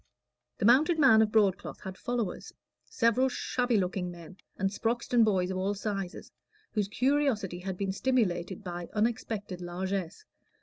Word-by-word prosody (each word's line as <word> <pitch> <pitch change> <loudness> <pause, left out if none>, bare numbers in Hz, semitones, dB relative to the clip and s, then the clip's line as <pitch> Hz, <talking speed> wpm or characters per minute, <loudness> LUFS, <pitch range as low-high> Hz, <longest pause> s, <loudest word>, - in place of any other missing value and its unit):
The - - -1
mounted 295 +9 +5
man 265 -8 +6
of 215 -1 +2
broadcloth 205 -4 +1
had 190 0 -7
followers: 235 -3 -3 0.3
several 240 +3 +2
shabby 245 -2 0
looking 180 -1 -1
men, 175 +1 -11 0.2
and 195 0 0
Sproxton 235 +3 +1
boys 190 -4 +1
of 185 - -3
all 195 +2 -1
sizes, 195 -3 -4 0.4
whose 210 -3 0
curiosity 245 -6 0
had 185 0 -5
been 195 0 -1
stimulated 195 -5 0
by 175 -2 -6
unexpected 210 -4 -2
largesse. 185 - -4
200 Hz, 140 wpm, -29 LUFS, 185-235 Hz, 0.4 s, man